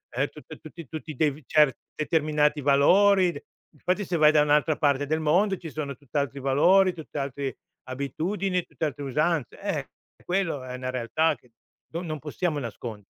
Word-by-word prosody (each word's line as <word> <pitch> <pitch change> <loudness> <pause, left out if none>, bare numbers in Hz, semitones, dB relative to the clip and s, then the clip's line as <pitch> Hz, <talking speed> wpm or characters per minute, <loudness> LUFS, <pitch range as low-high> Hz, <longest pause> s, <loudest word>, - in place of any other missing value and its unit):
uhm, - - +1
tutti - - -12
tutt-i 155 -1 -11
tutti 155 0 -7
de 150 0 0
cer 150 -5 +4 0.2
determinati 150 -1 +1
valori. 180 +7 +4 0.3
Infatti 185 +3 -1
se 175 -1 -1
vai 155 0 +6
da 150 -1 +4
un'altra 150 +1 +3
parte 145 -1 +2
del 155 +1 0
mondo 185 +6 +2
ci 165 -2 -8
sono 145 -3 -4
tutt'altri 140 0 -3
valori, 180 +8 +4
tutt'altri 140 -4 -5 0.3
abitudini, 175 +8 -2
tutt'altre 145 -3 -4
usanze. 150 +1 -1
Eh, - - -3 0.4
quello 175 -7 -1
è 125 0 -7
una 130 0 -4
realtà, 130 +6 +1
che 125 - -26 0.4
no 170 +2 -3
non 155 -3 -4
possiamo 155 +2 -2
nascondere. 115 -4 -7
150 Hz, 155 wpm, -26 LUFS, 140-170 Hz, 0.4 s, vai